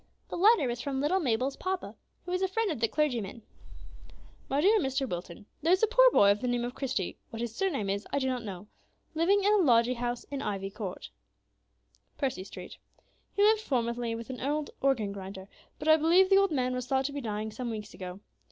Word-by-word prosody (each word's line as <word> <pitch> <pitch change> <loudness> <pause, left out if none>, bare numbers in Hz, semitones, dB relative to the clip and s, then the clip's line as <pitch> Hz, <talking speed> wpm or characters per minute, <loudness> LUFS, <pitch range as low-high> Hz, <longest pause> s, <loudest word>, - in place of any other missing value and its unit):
The - - -4
letter 405 - +5
was 240 0 -3
from 270 -1 -2
little 300 +7 +2
Mabel's 260 -2 0
papa, 375 0 -3 0.3
who 355 - -5
was 365 +1 0
a 380 - +2
friend 420 +1 0
of 295 - -4
the 230 - +2
clergyman. 235 -7 -1 1.1
"MY 275 +2 +1
DEAR 420 +6 +5
MR. 270 -3 -1
WILTON, 175 0 -6 0.2
There 325 +3 +2
is 370 +3 +3
a - - +6
poor - - +6
boy 200 - +5
of 205 - 0
the 250 - -1
name 245 -1 0
of 245 - -5
Christie 255 -10 -3
(what 225 - -7
his 235 -1 -3
surname 285 - -1
is 200 +1 -2
I - - 0
do 270 - 0
not 255 -2 -1
know) 195 -2 -7 0.5
living 375 +6 +3
in 410 +1 +4
a - - +5
lodging 245 - +4
house 240 0 -3
in 280 -1 -3
Ivy 195 -1 -3
Court, 195 -4 -7 1.1
Percy 260 -10 -2
Street. - - -10 0.6
He 405 - +3
lived 435 +1 +5
formerly 235 - -1
with 230 +3 -7
an 255 - -7
old 295 +3 -1
organ 240 -7 +1
grinder, 190 -1 -8 0.3
but - - -6
I 315 0 +7
believe 350 +5 +4
the 390 - +7
old 395 0 +3
man 255 -5 0
was 250 -1 -4
thought 265 0 +1
to 285 - -3
be 285 - -4
dying 215 -2 -3
some 245 +2 -5
weeks 215 -2 -6
ago. 185 +1 -8
255 Hz, 220 wpm, -29 LUFS, 225-325 Hz, 1.1 s, I